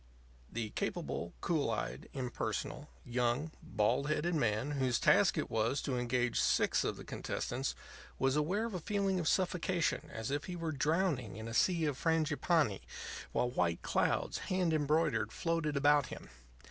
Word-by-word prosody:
The 110 -2 -3
capable, 85 +1 -3
cool 155 -7 +1
eyed, 110 - -3
impersonal, 125 -3 -3 0.2
young, 125 +5 0
bald 120 +7 +1
headed 170 +3 +1
man 120 -2 +1
whose 130 -4 +1
task - - +4
it - - 0
was 115 +5 +1
to 130 - -1
engage 125 0 +1
six - - +3
of - - -2
the - - -8
contestants, 130 +3 -3 0.4
was 135 +1 +2
aware 180 +9 +1
of 230 - -4
a 180 - -2
feeling 195 +1 0
of 165 - -1
suffocation 180 -2 +1
as 110 +3 -4
if 145 +1 -1
he 180 - -5
were 165 -2 -2
drowning 145 - 0
in 110 +1 -6
a 115 - -5
sea 170 - +3
of 145 -3 -1
frangipanni, 160 - +2 0.5
while 125 - +1
white 85 -7 0
clouds, - - +1
hand 185 -3 +2
embroidered, 150 -7 +2
floated 165 -3 -1
about 145 -1 +4
him. - - -9
145 Hz, 160 wpm, -34 LUFS, 120-165 Hz, 0.5 s, task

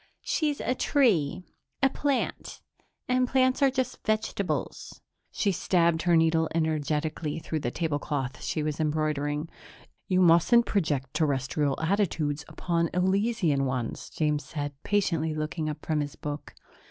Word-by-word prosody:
"She's 300 -3 0
a 255 - 0
tree. 185 - +2 0.4
A - - +8
plant. 280 -2 -2 0.5
And 255 0 +2
plants 260 +1 +2
are 275 - +6
just 260 -1 -3
vegetables." 200 - -2 0.3
She 200 - +1
stabbed 170 -2 +2
her 175 -1 +3
needle 160 0 +3
energetically 155 -1 -1
through 160 -1 -3
the 120 - -2
tablecloth 145 -2 -2
she 155 - -2
was 150 0 -2
embroidering. 150 -1 -1 0.6
"You 185 -1 +3
mustn't 180 +8 +5
project 145 -9 -1
Terrestrial 140 -1 0
attitudes 160 -4 0
upon 170 -2 -1
Elysian 190 -6 +2
ones," 130 -3 -3
James 150 -1 0
said, 145 -2 -4
patiently 165 -6 0
looking 155 +1 -2
up 150 0 -7
from 155 -1 0
his 145 -1 -3
book. 145 0 -6
160 Hz, 130 wpm, -27 LUFS, 150-195 Hz, 0.6 s, A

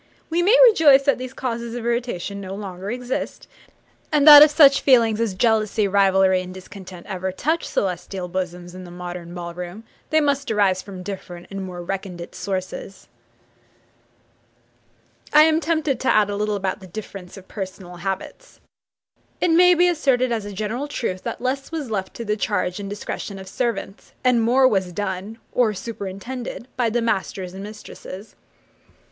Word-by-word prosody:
We 340 +2 +2
may 415 +8 +5
rejoice 295 - +6
that 280 -2 +2
these 255 0 -6
causes 235 -3 -4
of 240 -1 -5
irritation 235 -5 -2
no 190 0 -6
longer 195 -1 -6
exist; 250 +2 -4 0.6
and 300 -1 +3
that 295 -1 +12
if 300 - +9
such 290 -2 +6
feelings 230 -5 +4
as 215 -5 -1
jealousy, 215 -1 +2
rivalry, 190 -1 +3
and 185 0 -8
discontent 185 -1 -11
ever 190 -1 -3
touch 315 - -1
celestial 185 0 -3
bosoms 180 -1 -5
in 185 0 -9
the 180 - -10
modern 175 0 -7
ball 170 -1 -6
room 180 +5 -7 0.3
they 315 - +4
must 285 -2 0
arise 200 -4 +2
from 190 -3 -9
different 180 -3 -7
and 195 0 -5
more 180 -2 -7
recondite 180 -2 -6
sources. 190 0 -5 2.2
I 300 +1 +9
am 315 0 +3
tempted 310 -5 0
to 260 - -3
add 210 -1 +3
a - - -2
little 210 0 -1
about 190 0 -2
the 190 - -12
difference 195 -1 -9
of 190 -1 -13
personal 185 -3 -7
habits. 195 - -6 0.8
It 355 - +2
may 360 +2 +6
be 355 +1 +4
asserted 265 -7 +2
as 220 -3 -2
a 205 - -6
general 215 +8 -3
truth, 185 -10 -3
that - - -4
less 270 +3 -2
was 300 -8 -4
left 190 -3 -3
to 235 - -6
the 210 0 0
charge 205 -3 -1
and 200 -1 -5
discretion 205 0 -5
of 190 0 -10
servants, 215 -2 -4
and 250 -2 +4
more 255 +3 +4
was 190 -6 0
done, 200 +2 -4
or 225 -4 +2
superintended, 230 +4 -6
by 240 -2 +1
the 235 +1 0
masters 190 -4 -2
and 190 - -8
mistresses. 210 -1 -10
205 Hz, 170 wpm, -22 LUFS, 185-255 Hz, 2.2 s, that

